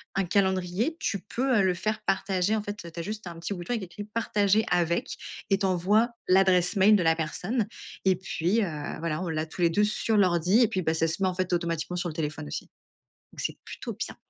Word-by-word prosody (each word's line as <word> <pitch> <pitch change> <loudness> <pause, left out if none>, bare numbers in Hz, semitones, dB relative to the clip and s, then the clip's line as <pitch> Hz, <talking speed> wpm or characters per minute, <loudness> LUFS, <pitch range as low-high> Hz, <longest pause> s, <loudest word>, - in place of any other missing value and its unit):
un 195 - +2
calendrier, 190 - +1
tu 200 -10 -1
peux, 250 +5 0
heu, - - +5
le 185 -1 +3
faire 215 +5 -2
partager 195 +1 +1
en 215 - 0
fait 205 0 -4 0.2
tu 170 - -8
as - - -3
juste 210 -1 -5
un 170 -1 -7
petit 185 +4 -3
bouton 175 +5 -6
avec 220 -5 -2
écrit 185 +3 -7
«Partager 215 -1 +2
avec» 175 - +1 0.3
et 195 - +4
tu 195 - 0
envoies 195 +6 +3 0.2
l'adresse 185 0 +4
mail 205 +2 +6
de 185 - +2
la 160 0 +4
personne, 195 +8 -2 0.4
et 190 -1 +5
puis, 185 +3 0
heu, 155 -5 -4
voilà, 165 0 -2
on 175 - -3
l'a 155 0 -1
tous 170 +3 -8
les 170 - +5
2 205 +5 +2
sur 215 +1 +1
l'ordi 185 +3 +4
et 230 - +6
puis 185 - -1
bah, 160 -1 +1
ça 165 0 +1
se 165 +5 -3
met 190 - +3
en 180 - -4
fait, 185 -1 -1
automatiquement 170 0 -1
sur 175 -1 -2
le 155 - -8
téléphone 150 - -3
aussi, 70 - -5 0.7
donc - - -9
c'est - - -3
plutôt - - -6
bien. - - -5
185 Hz, 235 wpm, -27 LUFS, 170-210 Hz, 0.7 s, mail